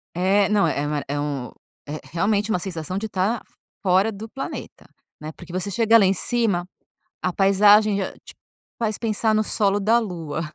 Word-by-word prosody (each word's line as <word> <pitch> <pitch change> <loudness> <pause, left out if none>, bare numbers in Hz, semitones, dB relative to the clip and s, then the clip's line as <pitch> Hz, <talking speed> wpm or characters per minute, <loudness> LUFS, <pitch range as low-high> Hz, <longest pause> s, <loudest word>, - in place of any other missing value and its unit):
É, 195 +3 +3
não 210 -1 +3
é 145 +1 -1
uma 150 -1 -2
é 145 0 -2
um 140 -4 -3 0.4
é 150 +1 -5
realmente 205 +4 0
uma 180 - +1
sensação 180 0 -4
de 220 +1 -4
tá 200 +4 -1 0.4
fora 190 +3 +3
do 215 +3 -8
planeta, 270 +4 -7 0.4
né, 155 +1 -7
porque, 175 -1 -12
você 185 +2 -2
chega 230 +2 +4
lá 205 - +4
em 190 - +4
cima, 195 -4 0 0.5
a 185 - 0
paisagem 205 +2 +5
já 190 - -3
te - - -11 0.4
faz 220 -2 -1
pensar 220 -1 0
no 215 - +3
solo 205 -2 +1
da 225 +4 +3
Lua. 170 -9 -4
195 Hz, 180 wpm, -23 LUFS, 175-215 Hz, 0.5 s, paisagem